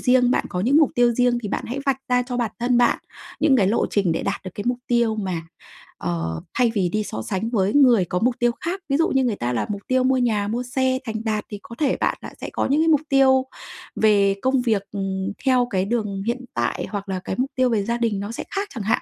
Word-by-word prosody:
riêng, 250 -1 +4
bạn - - +1
có 180 - -3
những 260 +8 +3
mục 310 -4 +5
tiêu 240 -1 +4
riêng, 245 0 +2
thì 205 - -4
bạn - - -3
hãy 255 +4 -4
vạch 270 -1 +2
ra 250 0 +3
cho 245 0 -5
bản 235 -4 -1
thân 240 0 +2
bạn 245 - +3 0.4
những 285 -4 +4
cái 195 -5 +3
lộ 215 - +2
trình 195 -5 +1
để 165 - -2
đạt 200 - -3
được 185 - -5
cái 205 - -5
mục 245 0 0
tiêu 235 -2 +2
mà, 185 -5 -3 0.6
ờ, 80 -2 -3
thay 240 -3 +2
vì 185 -4 +1
đi 215 +4 -1
so 110 - -5
sánh 205 - -3
với 205 -3 +1
người 245 -10 +5
có 180 +2 -2
mục 245 +1 +1
tiêu 240 0 +3
khác? 365 +4 -3
Ví 275 - +2
dụ 330 - +3
như 270 -1 +2
người 230 -4 0
ta 120 -6 -2
là 115 - 0
mục 200 -1 -4
tiêu 255 0 +2
mua 260 0 +3
nhà, 215 -5 +1
mua 235 +3 -2
xe, 260 +1 0
thành 220 0 -4
đạt 215 -2 -1
thì 205 -2 -7
có 235 - -10
thể 285 -4 +1
bạn - - 0
đã - - -9
sẽ - - -5
có - - 0
những 290 +4 +2
cái 325 - +2
mục 300 -3 +4
tiêu 265 -1 +4 0.5
về 200 -2 +3
công 260 0 +2
việc, 220 -5 +1
ừm, 195 0 -3
theo 250 -2 +3
cái 190 0 0
đường 205 -3 -2
hiện 250 +2 -2
tại 120 -1 -1
hoặc 200 -1 -5
là 185 -1 -2
cái 190 - -4
mục 265 +2 0
tiêu 255 -1 +2
về 215 -4 +1
gia 235 +3 -1
đình 225 -4 0
nó 205 +2 -5
sẽ - - -5
khác 400 +1 -1
chẳng 225 -5 -5
hạn. 215 - +1
235 Hz, 270 wpm, -22 LUFS, 200-255 Hz, 0.6 s, mục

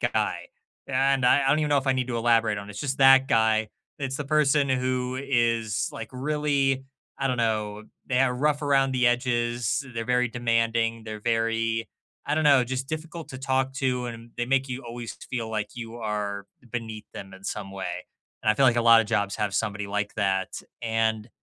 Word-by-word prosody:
guy. - - -1 0.4
And 135 0 +2
I 135 +3 +5
I - - +2
don't 145 - +4
even 150 - 0
know 145 -1 +3
if 135 - -4
I 135 - +4
need 130 -1 -1
to 120 - -2
elaborate 115 -2 +2
on 100 0 -8
it. - - -7
It's 105 - -7
just 135 -2 -2
that 135 0 +7
guy. 110 -1 +3 0.3
It's 135 -2 -3
the 150 - -4
person 145 -1 +3
who 130 0 -1
is, 115 -5 +1
like, 115 - -7
really, 140 -1 0 0.3
I 135 - 0
don't 130 - 0
know, 110 -2 -1 0.2
they're 130 0 +2
rough 145 +3 +1
around 135 -2 +3
the 125 -1 +2
edges. 120 +1 0
They're 115 - -2
very 125 0 +2
demanding. 115 -1 0
They're 110 -1 -6
very, 115 0 0 0.4
I 145 - +1
don't 155 0 +1
know, 140 -3 +6
just 130 +2 -4
difficult 160 +1 -6
to 130 - -8
talk 135 0 0
to, 125 -2 -1
and 115 0 -8
they 120 - 0
make 135 +1 +1
you 125 +2 -4
always 115 -1 -7
feel 115 -3 -3
like 110 -1 -2
you 115 -1 -7
are 105 -3 -3 0.3
beneath 110 -3 -5
them 95 -1 -9
in 95 0 -15
some 100 -1 -4
way. 90 -2 -5 0.4
And - - 0
I - - +3
feel 135 - +3
like 120 -2 +4
a - - +3
lotta 115 -1 +7
jobs 100 -2 -1
have 105 -2 -1
somebody 105 -1 -1
like 105 +1 -2
that. 95 -2 0 0.3
And 110 -1 0
120 Hz, 200 wpm, -26 LUFS, 110-135 Hz, 0.4 s, that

